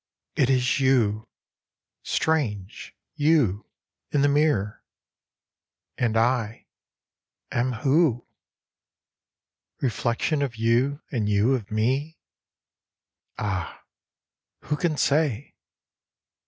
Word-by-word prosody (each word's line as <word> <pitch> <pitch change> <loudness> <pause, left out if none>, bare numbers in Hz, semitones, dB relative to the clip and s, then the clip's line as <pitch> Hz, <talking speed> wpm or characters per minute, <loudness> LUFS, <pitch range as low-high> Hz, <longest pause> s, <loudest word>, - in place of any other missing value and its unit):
"It 130 - +2
is 130 0 +2
you 115 -6 +2 0.7
strange 110 -12 -2 0.2
you, 145 - +2 0.4
in 145 -1 +1
the - - +5
mirror, 145 -9 +1 1.1
and 115 -2 0
I 115 -1 0 0.9
am 125 +2 0
who? 135 0 +2 1.5
Reflexion 125 +3 -1
of 135 -4 -2
you 120 +6 +1
and 110 -7 -1
you 105 +5 +3
of 115 -5 -3
me? 130 +9 -1 1.2
Ah, 95 -4 -4 0.8
who 150 +5 -2
can 155 -1 -1
say 145 -4 0
125 Hz, 85 wpm, -25 LUFS, 110-145 Hz, 1.5 s, the